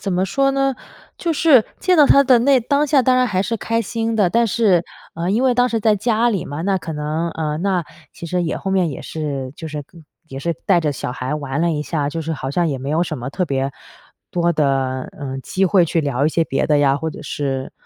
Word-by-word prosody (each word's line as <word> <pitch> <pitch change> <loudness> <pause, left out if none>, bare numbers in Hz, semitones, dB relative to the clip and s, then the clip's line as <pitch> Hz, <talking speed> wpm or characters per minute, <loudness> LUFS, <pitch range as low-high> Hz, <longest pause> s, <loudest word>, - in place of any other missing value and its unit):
怎 195 - -3
么 185 +1 +1
说 275 +8 +1
呢， 275 -1 +1 0.4
就 335 - -1
是 290 -7 +5 0.2
见 370 -1 +3
到 300 - +7
她 280 - +6
的 260 -3 +5
那 265 +1 +4
当 280 +5 +1
下 280 -1 +4
当 255 +1 +3
然 255 0 +3
还 190 -4 0
是 230 +3 -2
开 230 +2 -1
心 225 +1 -2
的， 205 -4 +3
但 235 +5 +2
是， 195 -5 +2 0.3
呃， 170 +3 -2
因 225 +5 +1
为 255 -2 +3
当 250 +1 +3
时 225 -2 -1
在 215 -1 +3
家 225 +3 +1
里 195 -9 -1
嘛， 145 +2 -6
那 195 +1 +1
可 165 -3 -5
能 155 +3 -2
呃， 155 -2 -3
那 185 -1 0 0.3
其 170 - -9
实 180 +1 -1
也 165 - -2
后 195 - -4
面 185 -4 +1
也 135 - -7
是 140 -4 -4
就 160 - -7
是 150 -1 -5 0.5
也 135 - -7
是 170 +4 -2
带 190 -3 +4
着 150 -2 0
小 130 - -5
孩 130 +2 -3
玩 140 -1 -3
了 170 - +2
一 150 -1 -2
下， 150 -2 -2
就 165 - -4
是 160 +1 -3
好 135 -2 -5
像 170 +3 +1
也 140 - -2
没 135 +2 -5
有 160 +3 +2
什 165 -3 -3
么 125 +3 -5
特 180 - -1
别 135 -1 -1 0.6
多 170 -1 +1
的， 135 -4 0
呃， 135 -2 -5
机 195 - 0
会 185 -1 +4
去 165 - 0
聊 140 -1 0
一 - - +3
些 165 +1 +1
别 135 - -1
的 150 - +3
呀， 140 -1 +3
或 160 - -3
者 150 - -10
是， 135 -2 -3
170 Hz, 270 characters per minute, -20 LUFS, 145-225 Hz, 0.6 s, 到